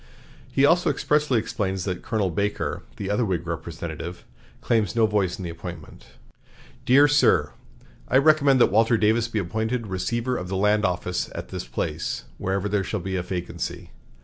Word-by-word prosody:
He 135 - +4
also 175 +4 +4
expressly 150 -4 +1
explains 100 -4 -2
that 90 -2 -3
Colonel 105 -5 -1
Baker, 100 +3 -2 0.2
the 100 - -3
other 105 +4 +1
Whig 90 -5 -1
representative, 85 0 -6 0.3
claims 110 -4 0
no 115 -1 +4
voice 105 -4 0
in 95 - -7
the 85 - -4
appointment. 85 -8 -9 0.8
"DEAR 140 +4 +7
SIR: 90 - +3 0.6
I 130 - +3
recommend 140 -2 +5
that - - +5
Walter 115 +2 +4
Davis 110 +2 +2
be 115 - -4
appointed 110 +5 -1
Receiver 115 +6 -2
of 90 - -5
the 95 +1 -2
Land 105 +1 +3
Office 90 0 -1
at - - -6
this - - -5
place, - - -3 0.2
whenever 95 +1 -1
there 105 -1 0
shall 105 - -3
be 95 +1 -4
a 90 - 0
vacancy. 90 -1 -5
105 Hz, 170 wpm, -24 LUFS, 90-115 Hz, 0.8 s, DEAR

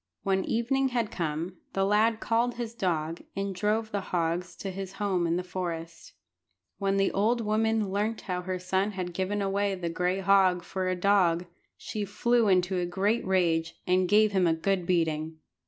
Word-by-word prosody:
When 190 -1 +1
evening 265 +4 +1
had 240 -4 -1
come, 170 +2 -3 0.2
the 195 0 +1
lad 220 +2 +3
called 235 +2 +1
his 235 -1 -5
dog, 165 -6 -2
and 195 0 -2
drove 215 +3 0
the 200 - -1
hogs 175 0 -2
to 195 - -5
his 190 0 -6
home 195 -4 0
in 165 - +1
the 180 - -1
forest. 170 -2 -6 0.7
When 195 -1 +1
the 195 0 +2
old 220 +5 +2
woman 220 -1 +1
learnt 210 +3 -1
how 180 -2 -3
her 185 0 -3
son 190 +3 -1
had 180 -2 -4
given 195 +3 -1
away 200 0 0
the 175 -2 -3
gray 180 +3 0
hog 190 -2 +4
for 185 +1 -3
a 185 - +1
dog, 180 -2 +3 0.3
she 215 - -4
flew 235 +3 +2
into 185 -1 +2
a 175 - 0
great 200 +6 0
rage, 165 -3 +1
and 180 0 +2
gave 215 +1 +5
him 190 -3 +3
a 165 - +3
good 180 +1 -1
beating. 160 -2 0
190 Hz, 185 wpm, -28 LUFS, 180-210 Hz, 0.7 s, gave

